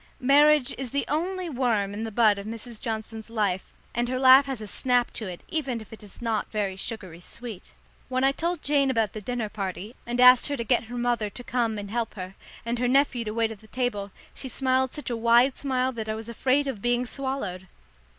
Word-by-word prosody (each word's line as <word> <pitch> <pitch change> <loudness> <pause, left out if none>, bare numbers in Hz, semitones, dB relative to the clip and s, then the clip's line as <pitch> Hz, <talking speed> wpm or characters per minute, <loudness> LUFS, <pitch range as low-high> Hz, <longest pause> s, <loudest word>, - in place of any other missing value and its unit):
Marriage 290 +1 +5
is 265 -2 -3
the 280 +3 -1
only 360 +5 -1
worm 235 -8 0
in 215 +2 -4
the 225 - -5
bud 215 -2 +4
of 200 - -7
Mrs. 230 0 -7
Johnson's 220 0 -5
life, 205 -5 -1 0.2
and 240 0 0
her 255 - -1
laugh 265 +1 +7
has 265 -4 -3
a 215 - -6
snap 245 +4 +1
to 220 - -4
it 180 -2 -7
even 270 -7 -2
if 220 +1 -12
it 225 - -11
is 210 +3 -13
not 225 -2 -1
very 205 -3 -2
sugary 190 -4 -5
sweet. 220 +2 -9 0.3
When 255 0 0
I 270 - +5
told 335 +3 -2
Jane 280 -2 +3
about 225 -5 +1
the 215 - -6
dinner 240 +1 -2
party 205 +1 -5
and 240 +1 -2
asked 250 0 +8
her 285 -1 -2
to 235 - -2
get 240 0 +2
her 245 +2 -7
mother 240 -3 0
to 245 - -9
come 235 -3 0
and 200 -1 -6
help 235 -1 -2
her, 185 -1 -6 0.3
and 235 +1 -1
her 250 - +1
nephew 260 -2 +3
to 215 - -3
wait 225 0 0
at 215 0 -12
table, 210 -6 -2 0.2
she 265 - -7
smiled 260 0 +1
such 295 -4 -5
a - - 0
wide 235 +3 +4
smile 260 -2 0
that 220 -3 -5
I 215 - -1
was 220 0 -7
afraid 260 +4 +1
of 260 -7 -4
being 240 +2 +1
swallowed. 245 -9 -4
240 Hz, 225 wpm, -26 LUFS, 215-260 Hz, 0.3 s, asked